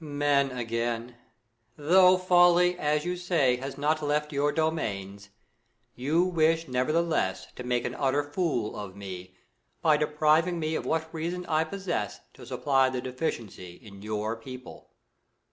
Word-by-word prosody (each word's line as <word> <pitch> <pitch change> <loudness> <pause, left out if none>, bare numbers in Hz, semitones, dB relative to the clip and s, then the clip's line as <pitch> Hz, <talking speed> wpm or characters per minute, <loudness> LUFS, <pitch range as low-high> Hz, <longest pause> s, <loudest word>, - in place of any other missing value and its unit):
Moon. 145 -2 -6 0.3
Men^ 125 - -8
again! 115 0 -3 0.6
Though 180 +5 +5
folly, 180 -1 +4
as 150 +1 0
you 180 0 -1
say, 170 -8 +1
has 135 +2 -6
not 155 +2 0
left 150 +1 -1
your 145 +1 +1
domains, 100 -12 -3 0.6
you 150 +7 +1
wish 165 -2 +1
nevertheless 130 - 0
to 125 - -6
make 125 -1 -1
an - - -3
utter 140 +1 +1
fool 145 - -2
of 100 -3 -7
me, 95 -2 -8 0.5
by 155 -3 +5
depriving 155 +3 +2
me 155 0 -2
of - - -3
what 160 0 -1
reason 170 +3 -3
I 155 -1 +1
pos 195 +4 -8
sess, 170 - -2
to - - -13
supply 135 -2 +2
the 130 -1 -3
deficiency 120 - -5
in 100 -2 -14
your 110 +1 -3
people. 125 +2 -11
145 Hz, 150 wpm, -27 LUFS, 120-165 Hz, 0.6 s, Though